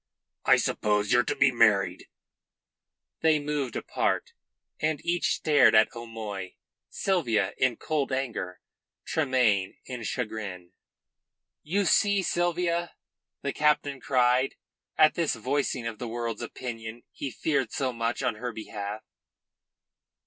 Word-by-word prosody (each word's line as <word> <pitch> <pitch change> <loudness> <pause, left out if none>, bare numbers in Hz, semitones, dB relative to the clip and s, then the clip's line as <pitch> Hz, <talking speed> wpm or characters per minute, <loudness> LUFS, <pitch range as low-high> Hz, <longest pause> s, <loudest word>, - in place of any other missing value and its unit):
I - - +7
suppose 105 -1 +1
you're 120 - +6
to 145 - -1
be 135 -1 +4
married." 110 -5 +3 1.1
They 160 -1 +4
moved 145 -4 -2
apart, - - -1 0.5
and 155 -1 0
each 170 0 +1
stared 150 -7 +4
at 110 +1 +5
O'Moy 110 -5 -6 0.3
Sylvia 120 - 0
in 130 -2 +3
cold 150 -4 -1
anger, 120 -9 -3 0.4
Tremayne 125 -10 +1
in 125 -2 -6
chagrin. 105 -6 -4 0.9
"You 195 +6 0
see, 200 +2 +3
Sylvia," 175 -1 0 0.5
the 140 - -1
captain 150 -2 +1
cried, 125 +1 +2 0.4
at 155 - +6
this 165 -6 0
voicing 130 +1 -1
of 115 -2 -5
the 125 - -4
world's 115 0 -3
opinion 120 -1 -6
he 140 - -5
feared 135 -2 -1
so 130 -2 -1
much 115 +2 -2
on 125 -4 0
her 125 +2 -4
behalf. 105 -1 -6
125 Hz, 120 wpm, -27 LUFS, 110-150 Hz, 1.1 s, I